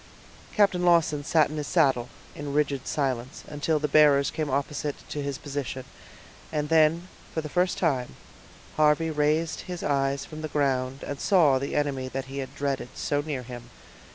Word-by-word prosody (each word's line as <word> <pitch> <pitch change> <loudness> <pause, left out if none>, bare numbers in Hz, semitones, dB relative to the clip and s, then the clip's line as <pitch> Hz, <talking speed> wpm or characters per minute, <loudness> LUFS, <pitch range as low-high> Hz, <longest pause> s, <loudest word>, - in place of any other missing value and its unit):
Captain 195 -4 +3
Lawton 165 -4 +3
sat 155 0 +3
in 155 - -5
his 150 -1 -3
saddle, 135 -8 +2 0.2
in 145 -1 -6
rigid 140 -3 0
silence, 130 -3 -2
until 150 +1 0
the 150 0 -1
bearers 145 -1 +5
came 155 -2 -2
opposite 140 +1 -2
to 150 - -3
his 140 -1 -3
position, 135 -3 -5 0.7
and 150 -1 -2
then, 165 +2 +3 0.2
for 160 - -2
the 155 - -6
first 180 +4 +1
time, 135 -8 0 0.6
Harvey 155 +1 +3
raised 155 +2 +1
his 180 -1 -5
eyes 140 -1 0
from 155 -1 -9
the 155 - -3
ground, 135 -2 -1
and 145 - -5
saw 155 -9 +4
the 140 +2 -4
enemy 140 -3 -1
that 130 +1 -4
he 135 +1 -4
dreaded 135 -2 -3
so 145 0 -1
near 145 -4 -4
him. 120 -1 -9
145 Hz, 170 wpm, -26 LUFS, 135-155 Hz, 0.7 s, bearers